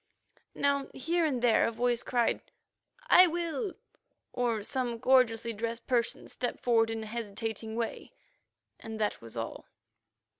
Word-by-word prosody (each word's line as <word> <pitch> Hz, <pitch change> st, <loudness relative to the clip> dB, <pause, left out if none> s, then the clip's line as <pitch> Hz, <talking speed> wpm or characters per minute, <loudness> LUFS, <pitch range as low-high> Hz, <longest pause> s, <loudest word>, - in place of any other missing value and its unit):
Now 280 Hz, -1 st, +1 dB
here 330 Hz, +4 st, +1 dB
and 255 Hz, -5 st, -2 dB
there 235 Hz, -2 st, +4 dB
a -, -, -1 dB
voice 240 Hz, +1 st, +1 dB
cried, 240 Hz, -2 st, +1 dB, 0.7 s
"I 365 Hz, -6 st, +8 dB
will," 345 Hz, +5 st, -2 dB, 0.6 s
or 235 Hz, -4 st, 0 dB
some 245 Hz, 0 st, -1 dB
gorgeously 235 Hz, -2 st, +3 dB
dressed 230 Hz, +2 st, -4 dB
person 240 Hz, -3 st, 0 dB
stepped 245 Hz, -, -4 dB
forward 225 Hz, -2 st, +3 dB
in 225 Hz, -1 st, -3 dB
a -, -, -6 dB
hesitating 220 Hz, 0 st, -4 dB
way, 230 Hz, -1 st, -4 dB, 0.7 s
and 220 Hz, -1 st, -7 dB
that 210 Hz, -1 st, -1 dB
was 115 Hz, 0 st, -6 dB
all. 115 Hz, 0 st, -5 dB
235 Hz, 140 wpm, -30 LUFS, 225-260 Hz, 0.7 s, I